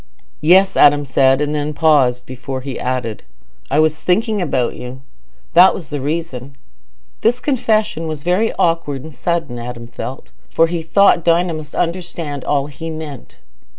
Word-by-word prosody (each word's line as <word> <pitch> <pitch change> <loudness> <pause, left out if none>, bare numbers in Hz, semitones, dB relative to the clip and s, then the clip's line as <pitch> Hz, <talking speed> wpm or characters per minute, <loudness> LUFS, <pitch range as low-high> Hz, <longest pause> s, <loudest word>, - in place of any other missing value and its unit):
"Yes," 185 +5 +5
Adam 145 0 +5
said, 135 +1 +3
and 150 0 -1
then 150 0 -2
paused, 135 -6 +3
before 130 +1 -6
he 135 -1 -6
added, 125 -4 -3 0.5
"I 140 - 0
was 155 0 +2
thinking 215 +4 0
about 130 -8 -1
you: 125 +1 -8 0.5
that 180 +2 +7
was 165 -7 -8
the 145 -2 -4
reason." 140 -3 -4 0.7
This 240 +3 +2
confession 220 - 0
was 155 -2 -5
very 185 +6 +1
awkward 155 -5 0
and 160 0 -10
sudden, 140 -3 -2
Adam 120 0 -7
felt, 130 +2 -8 0.2
for 165 - +3
he 165 0 -3
thought 170 +1 +3
Dinah 170 +1 +2
must 155 -1 -8
understand 170 -5 -3
all 140 -2 0
he 150 +3 -7
meant. 155 -5 -8
150 Hz, 155 wpm, -18 LUFS, 135-170 Hz, 0.7 s, that